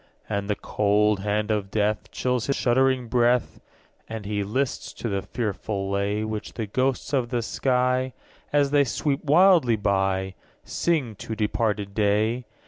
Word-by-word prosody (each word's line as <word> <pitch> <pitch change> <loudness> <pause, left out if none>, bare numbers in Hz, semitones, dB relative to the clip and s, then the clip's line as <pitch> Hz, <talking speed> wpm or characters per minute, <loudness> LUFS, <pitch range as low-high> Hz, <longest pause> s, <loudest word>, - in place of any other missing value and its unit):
2. - - -3
And 100 0 -2
the 105 - +1
cold 105 0 +1
hand 105 +2 -1
of 105 -2 -1
death 105 +1 0
Chills 125 -2 -1
his 140 - +1
shuddering 130 0 +2
breath, 120 +1 +1 0.5
As 110 -2 -6
he 105 0 -1
lists 130 +7 -2
to 115 - -4
the 100 -1 -1
fearful 100 -2 -3
lay 100 +2 0
Which 110 -1 -5
the 115 - -3
ghosts 130 +6 -1
of 125 -4 +1
the 120 -2 -1
sky, 125 +1 0 0.3
_10 - - -34
As 145 -1 +2
they 145 -1 +5
sweep 140 +2 -1
wildly 160 -5 +5
by, 95 -2 0 0.3
Sing 150 -10 -1
to 110 - -5
departed 105 -2 -1
day. 110 +4 +1
110 Hz, 160 wpm, -25 LUFS, 105-125 Hz, 0.5 s, they